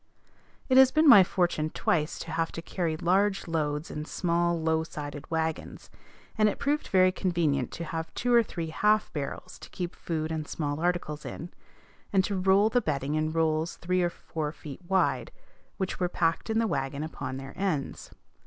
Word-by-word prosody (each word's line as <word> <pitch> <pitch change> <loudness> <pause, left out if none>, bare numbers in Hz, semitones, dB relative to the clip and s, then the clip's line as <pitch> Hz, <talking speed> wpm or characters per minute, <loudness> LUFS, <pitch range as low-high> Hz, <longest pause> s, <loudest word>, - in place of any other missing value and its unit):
It 260 - +4
has 265 -1 +8
been 310 +1 +4
my 200 -9 +10
fortune 175 -4 0
twice 155 -1 0
to 165 - -7
have 165 0 -1
to 165 - -5
carry 165 -2 -2
large 195 +4 +1
loads 150 -1 -2
in 150 0 -5
small 170 0 0
low 160 0 +1
sided 145 -2 -7
wagons; 160 -1 -3 0.5
and 215 0 +5
it - - -4
proved 295 +2 -1
very 185 -1 +4
convenient 165 - 0
to 170 - -5
have 165 0 -5
two 245 0 0
or 235 - +7
three 170 -7 -5
half 210 +5 +2
barrels 150 +4 -5
to - - -11
keep 175 -1 -5
food 160 -1 -3
and 155 -1 -3
small 145 -2 -3
articles 170 -3 -1
in, 170 +3 -7 0.6
and 195 -1 +3
to 200 - -2
roll 190 +2 +4
the 245 +1 +2
bedding 145 - -2
in 155 0 0
rolls 160 0 0
three 180 +1 0
or 175 - +2
four 155 -3 -5
feet 150 0 -10
wide, 190 0 +1 0.5
which 190 -1 -3
were 180 -1 +1
packed 165 +4 0
in 220 - +1
the 230 - +3
wagon 140 -6 -2
upon 155 -4 -5
their 135 0 -8
ends. 180 -8 -2
165 Hz, 185 wpm, -28 LUFS, 155-190 Hz, 0.6 s, my